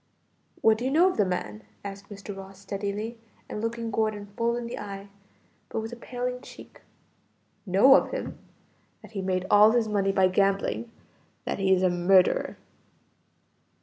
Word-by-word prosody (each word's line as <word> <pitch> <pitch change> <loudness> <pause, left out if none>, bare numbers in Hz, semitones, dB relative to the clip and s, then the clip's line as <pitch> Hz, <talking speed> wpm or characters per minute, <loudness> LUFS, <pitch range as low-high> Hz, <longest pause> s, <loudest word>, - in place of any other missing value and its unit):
"What 220 0 +4
do 245 - -3
you - - +1
know 340 +7 +5
of - - -8
the 205 - +4
man?" 105 - -3 0.2
asked 200 0 -8
Mr. 200 0 -8
Ross 195 0 -10
steadily 205 +3 -4 0.3
and 210 - -5
looking 230 0 -3
Gordon 215 -1 -1
full 235 +1 +1
in 240 - -4
the 235 - -5
eye, 200 -1 -7 0.6
but - - -2
with 225 +2 -5
a - - -5
paling 250 +1 -4
cheek. - - -13 0.9
"Know 200 +9 +7
of - - +3
him? - - -5 0.6
that - - -13
he 200 -3 -4
made 185 -1 -1
all 210 +2 +7
his 235 -2 +2
money 200 -2 +1
by 190 -1 +4
gambling; 195 +4 0 0.5
that - - -2
he 190 -1 +2
is 185 0 +4
a 185 - +4
murderer." 180 +1 +3
205 Hz, 170 wpm, -27 LUFS, 195-230 Hz, 0.9 s, Know